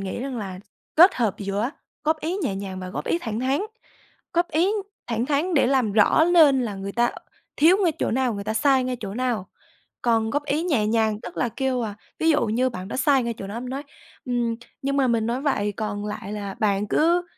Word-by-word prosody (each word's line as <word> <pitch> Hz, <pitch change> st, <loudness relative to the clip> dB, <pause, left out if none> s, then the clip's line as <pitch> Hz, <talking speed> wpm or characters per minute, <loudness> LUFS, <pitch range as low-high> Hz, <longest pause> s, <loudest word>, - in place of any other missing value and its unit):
nghĩ 195 Hz, +3 st, -4 dB
rằng 260 Hz, -1 st, -4 dB
là 190 Hz, -4 st, -5 dB, 0.4 s
kết 360 Hz, +4 st, +8 dB
hợp 225 Hz, -6 st, 0 dB
giữa 205 Hz, +4 st, -1 dB, 0.3 s
góp 315 Hz, 0 st, +1 dB
ý 335 Hz, +4 st, -2 dB
nhẹ 195 Hz, -7 st, -1 dB
nhàng 190 Hz, -1 st, -5 dB
và 185 Hz, -, -6 dB
góp -, -, -4 dB
ý 340 Hz, -, +1 dB
thẳng 225 Hz, -7 st, -4 dB
thắn, 265 Hz, +3 st, +1 dB, 0.7 s
góp 345 Hz, +1 st, +2 dB
ý 345 Hz, +6 st, +2 dB, 0.3 s
thẳng 235 Hz, 0 st, -1 dB
thắn 305 Hz, +5 st, 0 dB
để 275 Hz, -, +4 dB
làm 255 Hz, -5 st, +2 dB
rõ 215 Hz, +9 st, +5 dB
nên 290 Hz, -7 st, +6 dB
là 210 Hz, -4 st, -3 dB
người 195 Hz, +1 st, -5 dB
ta 240 Hz, +2 st, +2 dB, 0.5 s
thiếu 330 Hz, +5 st, +6 dB
ngay 335 Hz, -, +3 dB
chỗ -, -, 0 dB
nào, 255 Hz, -1 st, +1 dB
người 200 Hz, 0 st, -5 dB
ta 220 Hz, +1 st, -2 dB
sai 265 Hz, +2 st, +3 dB
ngay 255 Hz, 0 st, -2 dB
chỗ 200 Hz, -2 st, -5 dB
nào 240 Hz, -6 st, -1 dB, 0.6 s
còn 225 Hz, -2 st, +2 dB
góp 290 Hz, +4 st, -1 dB
ý 300 Hz, +3 st, 0 dB
nhẹ 270 Hz, -12 st, +1 dB
nhàng 220 Hz, -1 st, +1 dB
tức -, -, -9 dB
là 245 Hz, -, +1 dB
kêu, 260 Hz, 0 st, -1 dB
à, 210 Hz, -3 st, -4 dB, 0.2 s
ví 325 Hz, -, +3 dB
dụ 295 Hz, -5 st, +3 dB
như 240 Hz, +4 st, +1 dB
bạn 185 Hz, -5 st, -7 dB
đó -, -, -5 dB
sai 275 Hz, -2 st, +3 dB
ngay 235 Hz, 0 st, -2 dB
chỗ 195 Hz, -, -6 dB
đó, 200 Hz, -, -6 dB
em 250 Hz, +1 st, -5 dB
nói: 270 Hz, +2 st, -4 dB, 0.4 s
"Ừm, 240 Hz, -2 st, 0 dB, 0.3 s
nhưng 275 Hz, +1 st, -1 dB
mà 270 Hz, -2 st, +3 dB
mình 230 Hz, -2 st, +1 dB
nói 245 Hz, +3 st, -1 dB
vậy 210 Hz, -8 st, 0 dB
còn 205 Hz, -1 st, -3 dB
lại 210 Hz, -1 st, -5 dB
là 200 Hz, -2 st, -5 dB
bạn 205 Hz, -2 st, +1 dB
cứ 340 Hz, +7 st, +3 dB
240 Hz, 230 wpm, -24 LUFS, 210-280 Hz, 0.7 s, kết